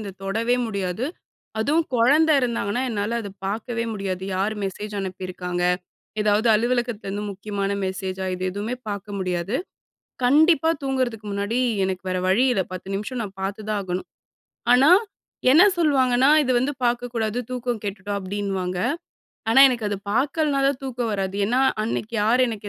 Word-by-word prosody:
இந்த 205 -2 -5
தொடவே 225 +5 +1
முடியாது. 200 +1 -2 0.5
அதுவும், 300 +9 +2
கொழந்த 285 +7 +4
இருந்தாங்கன்னா, 235 -1 -1
என்னால 215 +2 -1
அத 205 - -6 0.2
பாக்கவே 230 +3 -2
முடியாது. 190 -3 -3
யார் 200 +3 0
மெசேஜ் 205 +2 -5
அனுப்பியிருக்காங்க? 185 -1 -4 0.6
எதாவது 210 +2 +3
அலுவலகத்துலருந்து 225 -3 -1
முக்கியமான 200 0 -3 0.2
மெசேஜா? 190 0 -4
இது 180 - -6
எதுவுமே 205 +6 -3
பாக்க 200 -1 -4
முடியாது. 185 +4 -1 0.7
கண்டிப்பா 315 +4 +5
தூங்குறதுக்கு 255 -5 -1
முன்னாடி, 205 +4 -1 0.3
எனக்கு 190 -1 -2
வேறு 185 0 -1
வழி 215 +8 +4
இல்ல, 195 -5 +1
10 185 +1 -7
நிமிஷம் 235 +5 -3
நான் 195 -2 -7
பாத்துதான் 205 +1 -2
ஆகணும். 185 -1 -4 0.7
ஆனா, 275 +6 +6 0.6
என்னா 325 +9 +8
சொல்வாங்கன்னா, 265 -5 +3
"இது 260 -2 +1
வந்து 265 +4 0
பாக்கக்கூடாது. 240 -2 -1
தூக்கம் 245 -2 -2
கெட்டுடும்" 200 0 -3
அப்டின்னுவாங்க. 190 -2 -3 0.7
ஆனா, 240 +4 +6
எனக்கு 235 -4 -2
அது 205 - -2 0.2
பாக்கலன்னா 280 +3 +1
தான், 275 -2 -2
தூக்கம் 245 -3 -2
வராது. 195 -1 -2
ஏன்னா 245 +5 +2 0.2
அன்னைக்கு, 220 0 -3
யார் 240 +4 +4
எனக்கு 215 -2 -5
215 Hz, 140 wpm, -23 LUFS, 195-245 Hz, 0.7 s, என்னா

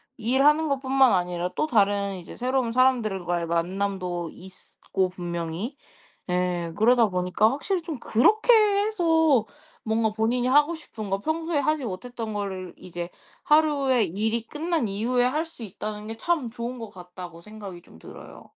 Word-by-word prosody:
일하는 285 +7 +3
것뿐만 270 -2 +3
아니라 180 -1 0
또 305 - 0
다른 200 -5 +2
이제 175 -2 -10
새로운 255 -1 0
사람들과의 215 -9 +1
만남도 180 0 -2
있고 185 0 -4
분명히. 175 - -4 0.5
예. 180 -2 -1
그러다 230 +2 +4
보니까 180 +3 +2
확실히 350 +6 -1
좀 320 -4 -5
그렇게 430 - +4
해서 360 - +3 0.4
뭔가 220 0 +1
본인이 235 +3 0
하고 295 +5 +4
싶은 220 -10 -8
거 195 0 0
평소에 320 +4 -1
하지 305 -2 0
못했던 225 +2 -5
거를 190 -3 -4
이제 175 -1 -6 0.4
하루에 290 -5 +3
일이 215 +5 -1
끝난 310 -1 -1
이후에 230 +5 +1
할 300 +6 +1
수 325 -7 -13
있다는 210 +1 -6
게 225 - -5
참 285 -1 -1
좋은 240 +2 -5
것 225 - -7
같다고 180 -2 -10
생각이 200 -3 -10
좀 80 - -18
들어요. - - -12
225 Hz, 315 characters per minute, -25 LUFS, 185-275 Hz, 0.5 s, 그러다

